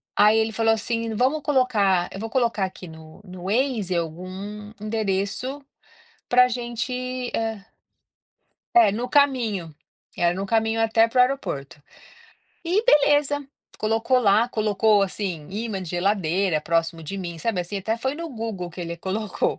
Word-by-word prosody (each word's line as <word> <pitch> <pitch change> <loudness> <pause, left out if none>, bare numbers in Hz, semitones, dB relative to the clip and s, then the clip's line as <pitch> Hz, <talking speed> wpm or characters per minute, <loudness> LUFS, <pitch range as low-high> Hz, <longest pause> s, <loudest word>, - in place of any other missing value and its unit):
Aí 210 +1 +5
ele 220 0 +1
falou 225 0 +2
assim: 230 0 -2
"Vamos 265 +7 +1
colocar 215 -11 +2
eu 195 - -7
vou 225 +2 -4
colocar 230 -5 +1
aqui 185 -1 -9
no 160 0 -13
no 180 -1 -10
Waze 215 -3 0
algum 185 +5 -5
endereço 215 +5 -2 0.7
para 250 0 +6
gente, 250 +1 -3
eh". 225 -2 -2 1.1
É, 350 - +7
no 235 +5 -3
caminho, 245 - +2 0.5
era 175 0 +2
no 195 +2 -3
caminho 225 +1 +1
até 225 0 +4
para 250 +2 0
o - - +9
aeroporto. 180 - -1 0.8
E 370 +6 +1
beleza, 290 - +3 0.3
colocou 225 +4 +2
lá, 215 -1 +4
colocou 215 -2 +2
assim, 185 -5 -3
ímã 210 -1 -3
de 180 - -7
geladeira 185 -2 +1
próximo 165 0 -1
de 180 +6 -6
mim, 175 -3 -5
sabe 205 +1 -1
assim? 195 +3 -5
Até 220 +4 -1
foi 265 +4 -2
no 335 +2 -5
Google 220 - -5
que 175 - -14
ele 170 -1 -4
colocou. 195 +4 -2
215 Hz, 150 wpm, -24 LUFS, 185-245 Hz, 1.1 s, o